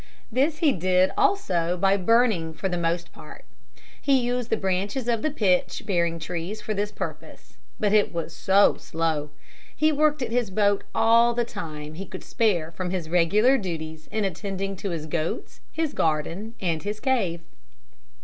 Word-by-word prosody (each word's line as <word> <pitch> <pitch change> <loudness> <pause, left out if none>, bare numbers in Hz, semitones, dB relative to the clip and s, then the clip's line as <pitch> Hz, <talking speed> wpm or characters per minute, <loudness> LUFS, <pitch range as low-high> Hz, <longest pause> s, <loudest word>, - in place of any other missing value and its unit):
This 280 +6 +1
he 295 - +6
did 185 -1 +2
also 180 - +1
by 195 +2 +3
burning 200 -5 +2
for 190 - -2
the 180 - -2
most 170 0 -1
part. - - -13 0.6
He 275 -1 +3
used 245 -1 -1
the 225 - +1
branches 200 +6 -1
of 230 -2 +1
pitch 185 -7 +1
bearing 170 -4 +1
trees 175 +5 -5
for 215 +1 -3
this 205 +1 -2
purpose. - - -8 0.2
But 205 -1 +1
it 210 -1 +4
was 165 -1 -4
so 195 +5 +4
slow. 160 -2 -2 0.5
He 310 0 +3
worked 300 -1 +2
at 230 - -4
his 240 -3 0
boat 200 +1 +1
all 230 +1 +5
the 240 0 +1
time 155 -9 -7
he 190 +4 -7
could - - -8
spare 175 -8 0
from 180 +2 -4
his 175 -3 -3
regular 210 +10 +4
duties 160 -4 -6
in 220 - 0
attending 195 +1 -3
to 200 - -4
his 165 -3 -4
goats, 160 +1 -3
his 320 -2 -2
garden 165 +8 -1
and 165 -4 -1
his 210 +1 -4
cave. 210 -10 0
195 Hz, 170 wpm, -25 LUFS, 170-230 Hz, 0.6 s, he